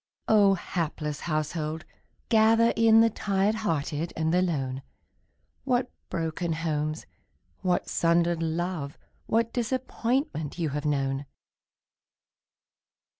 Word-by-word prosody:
Oh, 205 -3 +5
hapless 155 -4 -3
household, 155 0 -2 0.4
gather 225 +1 +5
in 225 0 +6
The 225 0 +4
tired 200 0 +1
hearted 165 -6 -2
and 160 +1 +1
the 180 - +4
lone! 135 -7 -1 0.8
What 250 -1 0 0.2
broken 165 0 -2
homes, 155 -1 -2 0.5
what 180 -2 0
sundered 170 0 +2
love, 165 -3 -2 0.3
What 230 +1 +1
disappointment 245 - -1
you 165 -3 -1
have 145 +1 -4
known! 135 -1 -1
170 Hz, 100 wpm, -27 LUFS, 155-220 Hz, 0.8 s, in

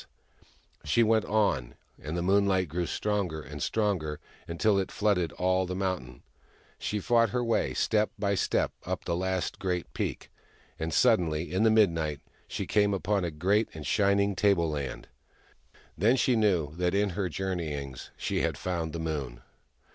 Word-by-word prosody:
So - - -17 0.8
she 95 +11 +3
went 110 -1 +3
on, 75 - 0 0.3
and 80 +3 -4
the 85 - -1
moonlight 95 -1 +3
grew 85 +3 -2
stronger 100 -7 -1
and 75 -1 -8
stronger, 90 -9 -1 0.3
until 100 +5 +2
it 95 - -2
flooded 95 -6 +1
all 95 0 +1
the 90 - -3
mountain. 90 -11 -3 0.6
She 105 - -2
fought 115 +2 +3
her 125 +3 -1
way, 115 -1 0
step 105 -1 +2
by 100 -1 0
step, 95 - +1
up - - -4
the 85 - 0
last 95 0 -2
great 90 -3 -2
peak. - - -4 0.5
And, 80 0 -2
suddenly, 85 - +2
in 95 - +1
the 110 - +5
midnight, 85 -9 +2 0.3
she - - -4
came 100 -1 +2
out - - 0
upon 100 +1 0
a 85 - -1
great 95 +8 +1
and 75 -2 -7
shining 100 -1 +2
tableland: 85 -9 0 0.9
then 110 +8 +3
she 130 -1 +2
knew 90 -9 +1
that 90 +1 +1
in 100 0 +2
her 95 0 -2
journeyings 75 -7 -4
she - - -1
had - - -1
found 85 -3 -3
the 85 - -4
Moon 70 -7 -4
95 Hz, 165 wpm, -29 LUFS, 80-105 Hz, 0.9 s, the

